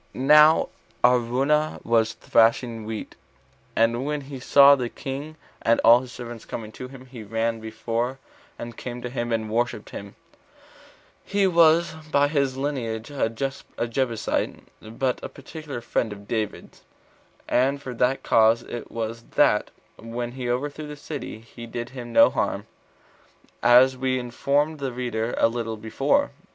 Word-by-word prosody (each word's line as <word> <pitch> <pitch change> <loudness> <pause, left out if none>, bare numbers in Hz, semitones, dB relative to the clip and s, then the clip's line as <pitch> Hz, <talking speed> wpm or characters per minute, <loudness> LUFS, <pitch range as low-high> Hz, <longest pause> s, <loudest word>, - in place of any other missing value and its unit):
Now 150 +4 +6 0.3
Araunah 125 +5 +2
was 115 -1 +2
thrashing 115 0 +2
wheat; 110 -1 -6 0.6
and 115 +2 +2
when 150 +1 -2
he 135 -1 -8
saw 140 +2 +7
the 125 -4 0
king 140 +4 -6 0.3
and 115 0 +3
all 115 +2 +7
his 125 -1 -9
servants 120 -2 -8
coming 110 -2 -7
to 125 - -8
him, 130 0 -12
he 125 -3 -10
ran 115 +2 -2
before, 115 +3 -3 0.4
and 120 -1 -7
came 120 0 -7
to 125 - -5
him 120 -2 -3
and 110 -1 -1
worshipped 110 -1 -2
him: 100 0 -8 1.1
he 200 0 +1
was 170 -2 +4 0.2
by 145 0 +3
his 140 -3 0
lineage 125 -4 -3
a 135 -5 0
Jebusite, 120 -1 -3 0.2
but 125 +4 -3
a - - -5
particular 145 -2 -8
friend 115 -1 -1
of 100 0 -10
David's; 110 -3 -4 0.7
and 135 +3 +2
for 130 -2 -7
that 125 +3 0
cause 115 +1 +4
it 120 - -7
was 115 0 -4
that, - - +3 0.3
when 120 +1 -5
he 125 -1 -5
overthrew 145 +5 -3
the 150 - -7
city, 145 -6 -7
he 115 +1 -11
did 120 +1 -5
him 120 -3 -8
no - - +6
harm, - - -1 1.0
as 130 +2 +6
we 130 0 0
informed 140 +5 0
the 135 -2 -3
reader 120 -2 -2
a - - +5
little 115 -1 -4
before. 135 - +1
125 Hz, 150 wpm, -24 LUFS, 115-140 Hz, 1.1 s, saw